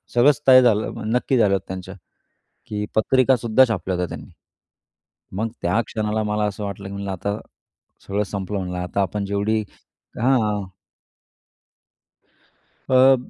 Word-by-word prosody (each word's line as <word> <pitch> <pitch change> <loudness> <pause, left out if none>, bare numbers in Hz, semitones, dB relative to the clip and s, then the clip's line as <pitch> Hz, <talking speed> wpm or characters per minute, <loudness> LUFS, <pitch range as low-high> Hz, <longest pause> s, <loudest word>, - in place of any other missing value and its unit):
सगळंच 140 +4 +4
तय 130 -1 +9
झालं, 110 -3 +1
नक्की 125 +1 +1
झालं 105 -4 +4
होतं 95 -1 -1
त्यांचं. 95 0 -7 0.7
की 105 0 -3
पत्रिकासुद्धा 130 +1 +4
छापल्या 95 -4 -2
होत्या 90 0 -1
त्यांनी. - - -12 1.1
मग 110 +2 -1
त्या 90 +6 +1
क्षणाला 110 0 -1
मला 105 0 -1
असं 105 0 -4
वाटलं 100 0 -6
की - - -8
म्हणलं, 100 0 -4
"आता, 100 +3 -3 0.7
सगळं 100 +1 0
संपलं," 100 0 -4
म्हणलं, 90 -1 -4
"आता 90 +2 -2
आपण 100 +2 -2
जेवढी" 100 +2 0 0.6
हां. 110 -5 +2 2.3
अ, 130 +1 +6
105 Hz, 130 wpm, -22 LUFS, 100-115 Hz, 2.3 s, तय